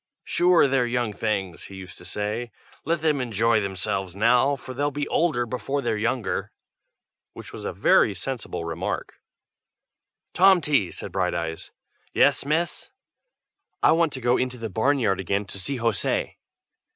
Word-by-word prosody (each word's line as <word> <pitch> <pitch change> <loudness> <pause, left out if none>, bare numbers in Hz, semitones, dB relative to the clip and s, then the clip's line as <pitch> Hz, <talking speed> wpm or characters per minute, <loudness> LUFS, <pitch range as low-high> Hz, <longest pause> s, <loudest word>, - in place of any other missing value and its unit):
"Sure, 175 -3 +4
they're 130 -2 +2
young 120 -3 -1
things!" 100 -5 -2
he 100 - -10
used 95 -2 -9
to 90 - -13
say. 105 +5 -3 0.3
"Let 165 +1 0
them 150 -4 +2
enjoy 115 -1 +2
themselves 95 -1 -2
now, 125 +6 +3
for 130 -1 -9
they'll 145 +3 0
be 145 0 -3
older 150 -8 +1
before 130 +4 -3
they're - - 0
younger!" 115 +2 -1 0.8
Which - - -11
was - - -8
a - - -2
very 100 - +3
sensible 110 -4 -5
remark. 85 - -4 1.1
"Tomty!" 165 - +4
said 100 - -7
Brighteyes. 85 -3 -2 0.5
"Yes, - - +4
miss." 165 +3 -1 0.9
"I - - +6
want 165 -1 +3
to 130 - -5
go 120 +1 +3
into 125 0 -2
the 115 -3 -5
barn 135 +8 +2
yard 105 -7 +1
again 100 +2 -1
to 100 - -8
see 130 +9 -2
José." 115 -4 0
120 Hz, 150 wpm, -25 LUFS, 100-140 Hz, 1.1 s, I